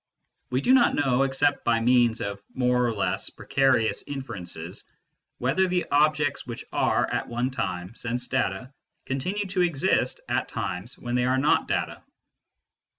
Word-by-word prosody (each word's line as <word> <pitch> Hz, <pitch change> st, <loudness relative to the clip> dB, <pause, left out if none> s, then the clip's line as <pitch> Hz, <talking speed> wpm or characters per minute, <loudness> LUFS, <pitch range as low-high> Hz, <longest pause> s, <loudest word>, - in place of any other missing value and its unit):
We 125 Hz, +1 st, 0 dB
do 255 Hz, -, +4 dB
not 250 Hz, -2 st, +5 dB
know, 135 Hz, -3 st, +2 dB
except 135 Hz, +1 st, +1 dB
by 115 Hz, -1 st, +2 dB
means 120 Hz, -1 st, +3 dB
of 100 Hz, 0 st, -4 dB
more 125 Hz, -1 st, +2 dB
or -, -, 0 dB
less 105 Hz, -, -1 dB
precarious 135 Hz, -5 st, +1 dB
inferences, 90 Hz, -, -6 dB, 0.5 s
whether 140 Hz, +10 st, +1 dB
the 180 Hz, -1 st, 0 dB
objects 150 Hz, -1 st, +2 dB
which 120 Hz, -, -6 dB
are -, -, +2 dB
at -, -, -1 dB
one 120 Hz, +2 st, -1 dB
time 95 Hz, -6 st, -3 dB
sense 120 Hz, +1 st, -3 dB
data 130 Hz, +1 st, -2 dB, 0.3 s
continue 180 Hz, +11 st, -2 dB
to 185 Hz, -1 st, 0 dB
exist 170 Hz, -6 st, +1 dB
at -, -, 0 dB
times 100 Hz, +8 st, -4 dB
when 120 Hz, -, -5 dB
they 125 Hz, 0 st, +2 dB
are 130 Hz, +1 st, +2 dB
not 145 Hz, +3 st, +2 dB
data. -, -, -2 dB
125 Hz, 150 wpm, -26 LUFS, 115-145 Hz, 0.5 s, not